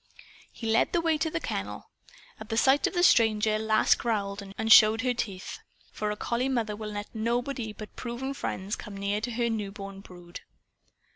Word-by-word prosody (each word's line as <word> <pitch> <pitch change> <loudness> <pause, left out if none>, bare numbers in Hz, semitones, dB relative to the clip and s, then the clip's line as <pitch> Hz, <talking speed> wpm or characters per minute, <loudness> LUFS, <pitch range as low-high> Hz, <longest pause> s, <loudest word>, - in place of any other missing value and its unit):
He 230 - -9
led 225 - +2
the 345 - +3
way 325 -2 +1
to 320 - 0
the 330 - -2
kennel. - - -5 0.5
At 220 - -10
sight 265 +4 +4
of - - -5
the 350 - +2
stranger 215 -6 +4
Lass 220 0 +3
growled 205 -3 -2 0.2
and 220 0 +5
showed 220 +1 +7
her 250 -1 +1
teeth. 195 -6 -5 0.3
For 210 - -3
a 210 - -2
collie 240 +4 -1
mother 225 -5 -1
will 215 0 -6
let 205 0 -6
nobody 235 +1 -2
but 210 0 -10
proven 250 +3 -4
friends 200 -6 -4
come 210 -3 -9
near 200 +1 -1
to 240 - -3
her 235 0 -1
newborn 200 -3 -5
brood. 175 -2 -11
220 Hz, 185 wpm, -28 LUFS, 210-245 Hz, 0.5 s, showed